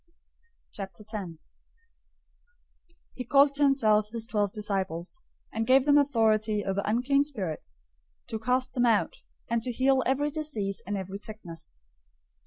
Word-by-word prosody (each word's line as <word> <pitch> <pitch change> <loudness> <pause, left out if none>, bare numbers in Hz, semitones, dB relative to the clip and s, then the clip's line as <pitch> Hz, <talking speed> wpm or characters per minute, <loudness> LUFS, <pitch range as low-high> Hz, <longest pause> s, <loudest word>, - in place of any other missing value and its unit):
010:001 195 -2 -7 1.8
He 250 - -5
called 280 +3 +4
to 285 - -4
himself 215 -7 +4
his 225 0 -4
twelve 205 -4 0
disciples, 195 - -3 0.3
and 225 0 -2
gave 260 +1 +5
them 290 0 +6
authority 220 -6 +2
over 195 +1 0
unclean 250 +6 +2
spirits, 200 - -6 0.4
to 220 - -5
cast 250 +3 0
them 245 -2 +2
out, 220 -3 +2 0.3
and 235 0 0
to 245 - -2
heal 260 +2 +3
every 285 +3 +1
disease 255 -11 -2
and 205 0 -2
every 190 +1 -5
sickness. 170 - -7
220 Hz, 130 wpm, -28 LUFS, 200-265 Hz, 1.8 s, them